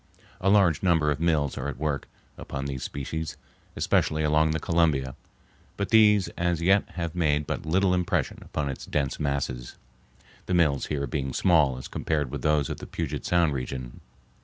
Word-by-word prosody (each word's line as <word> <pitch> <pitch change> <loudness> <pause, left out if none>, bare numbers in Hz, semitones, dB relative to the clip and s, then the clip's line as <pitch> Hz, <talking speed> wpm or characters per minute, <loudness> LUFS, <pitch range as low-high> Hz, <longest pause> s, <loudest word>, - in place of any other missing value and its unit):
A 95 - +1
large 95 -7 +4
number 80 -5 +3
of 75 - -2
mills 80 -4 +1
are - - -3
at - - -5
work 75 0 -2 0.3
upon 70 0 -6
this 70 -2 -4
species, 80 +3 -4 0.4
especially 80 0 +1
along 75 +1 +3
the 80 +1 0
Columbia, 75 -6 +1 0.6
but 100 -2 -2
these 105 -3 +5
as 85 -1 -1
yet 95 +4 +3
have 85 -2 -3
made 75 -4 +1
but 80 - -4
little 95 +3 +3
impression 90 -4 0
upon 75 - -3
its 70 - -6
dense 70 -3 -1
masses, 70 -4 -2 0.7
the 90 - +1
mills 75 -6 +2
here 70 -2 -2
being 65 0 -3
small 75 -8 +3
as 65 - -7
compared 75 -5 -2
with - - -4
those 75 -3 +2
of - - -4
the - - -8
Puget 75 -4 -4
Sound 85 -4 +3
region. 65 -2 -5
75 Hz, 175 wpm, -26 LUFS, 70-85 Hz, 0.7 s, these